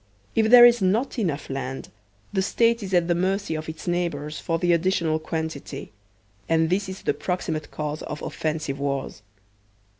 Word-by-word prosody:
If 220 -1 +3
there 240 0 +10
is 240 -2 +5
not 220 +8 +1
enough 155 -8 -1
land, 135 -1 -5 0.4
the 190 - +2
State 230 +4 +2
is 195 -2 -6
at 175 -2 +3
the 175 - +3
mercy 190 +1 0
of 155 0 -4
its 160 +2 -8
neighbors 160 -4 -2
for 165 - -1
the 175 +1 +2
additional 165 -2 +1
quantity; 160 -5 -5 0.6
and 160 0 +2
this 190 +1 0
is 190 - -8
the - - +1
proximate 165 -4 -3
cause 150 0 -4
of 150 - -6
offensive 155 -3 -3
wars. 140 -5 -3
165 Hz, 170 wpm, -24 LUFS, 155-190 Hz, 0.6 s, there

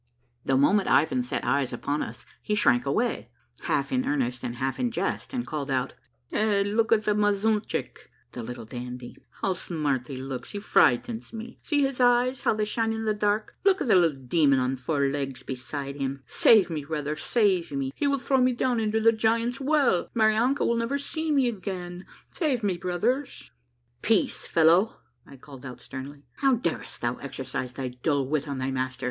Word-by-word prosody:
The 135 - +2
moment 195 +9 +3
Ivan 140 -3 +3
set 125 - -3
eyes 140 -2 +1
upon 140 +4 -2
us - - -7 0.2
he 210 - -1
shrank 130 - +3
away, 230 - 0 0.4
half - - 0
in 255 0 0
earnest 125 -4 -1
and 120 - -3
half 130 +2 -2
in 250 -1 +1
jest, 230 - -3
and 250 -3 -3
called 145 -2 -4
out, 130 -2 -1 0.2
— - - -25
''Hey, 210 -2 +2
look 220 +3 0
at' 220 -1 +4
the 210 - +3
mazuntchick! 210 +1 0 0.3
[Little 120 -1 -6
Dandy!] 125 +1 -7 0.3
How 190 - +2
smart 150 -8 -2
he 135 - -6
looks! 130 -1 -6
He 205 - -3
frightens 200 - +2
me! 230 +2 -8
See 290 -2 +1
his 270 -2 -1
eyes, 245 +1 +3
how - - +2
they 215 0 0
shine 225 +1 0
in 220 0 -3
the 215 - +2
dark! 210 +1 0
Look 385 -1 +4
at 285 - -2
the 220 - +5
little 165 -6 +4
demon 140 +1 +3
on 130 +1 0
four 140 +3 -2
legs 135 -2 -2
beside 140 +2 -5
him! 135 -1 -3
Save 195 - +5
me, 155 -3 -3
brothers! 150 0 -3
Save 200 -7 +1
me 135 -1 -2
— - - -40
he 285 - 0
will 280 0 +2
throw 270 +1 +1
me 255 0 +3
down 245 0 0
into 220 0 +1
the 225 +1 +5
Giants' 230 +3 0
Well! 275 - +2
Marianka 225 +5 +3
will 235 - +2
never 230 +4 0
see 315 +3 -4
me 275 -4 +3
again 195 -4 -3
I 180 -1 -6
Never 175 0 -8
1 185 - -13 0.3
Save 275 - -1
me, 190 -4 0
brothers! 185 - -2
" 120 0 -46
'' 120 +1 -44
Peace, 220 -3 +1
fellow," 170 +7 +3 0.3
I 135 - -13
called 135 -1 -13
out 130 -2 -8
sternly. 140 +2 -9
" - - -40
How 270 -2 +4
darest 175 -8 -4
thou 120 +1 -1
exercise 130 -2 -5
thy 130 0 -4
dull 135 +3 -1
wit 150 +1 -1
on 140 -1 -3
thy 130 +1 -2
master? 130 0 -3
175 Hz, 205 wpm, -26 LUFS, -, 0.4 s, the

